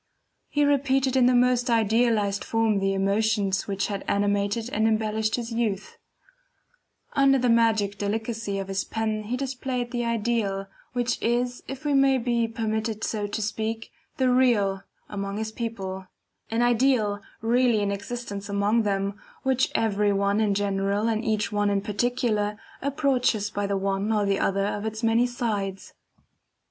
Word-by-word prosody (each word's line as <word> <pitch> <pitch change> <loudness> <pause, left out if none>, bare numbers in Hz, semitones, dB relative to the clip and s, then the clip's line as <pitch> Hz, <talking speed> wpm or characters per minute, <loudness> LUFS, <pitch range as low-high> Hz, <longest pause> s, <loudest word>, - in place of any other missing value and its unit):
He 290 0 +2
repeated 270 -2 +2
in 255 -2 +5
the 250 - +4
most 245 0 +3
idealized 220 -2 +2
form 225 -2 +1
the 195 0 0
emotions 200 0 +1
which 200 -1 -1
had 200 -2 -4
animated 205 +2 0
and 220 +1 +2
embellished 220 0 0
his 235 -1 -5
youth; 225 -4 -2 1.1
under 275 -1 +4
the 250 -2 +2
magic 220 -3 +2
delicacy 220 0 -2
of 195 -1 -4
his 195 0 -1
pen 220 -1 -2
he 245 +4 -2
displayed 255 -2 -3
the 240 -1 -1
Ideal, 225 -4 -1 0.3
which 245 -1 -1
is, 245 +1 0
if 270 +2 -7
we 290 - +1
may 270 -1 +4
be 235 -1 0
permitted 220 -1 -2
so 210 -2 -1
to 205 +2 -3
speak, 220 +2 -3 0.3
the 260 -1 +3
Real 215 -7 +3 0.3
among 200 0 -4
his 220 0 -3
people; 195 -5 -5 0.4
an 230 +2 +1
Ideal 240 -4 +2 0.2
really 235 -1 +3
in 200 0 0
existence 200 -1 -5
among 200 +3 +2
them, 200 0 -1 0.2
which 265 -1 +2
every 210 -2 +2
one 200 +1 +1
in 205 -2 +2
general 200 +1 0
and 220 0 -1
each 215 -1 0
one 205 0 +1
in 200 -1 +1
particular 210 -1 0 0.2
approaches 260 -7 +1
by 205 -1 -2
the 200 0 0
one 195 +2 -1
or 210 -2 +2
the 195 0 +1
other 195 0 +1
of 205 0 -2
its 220 +1 -4
many 230 +2 +3
sides. 205 -6 -3
220 Hz, 155 wpm, -26 LUFS, 200-240 Hz, 1.1 s, in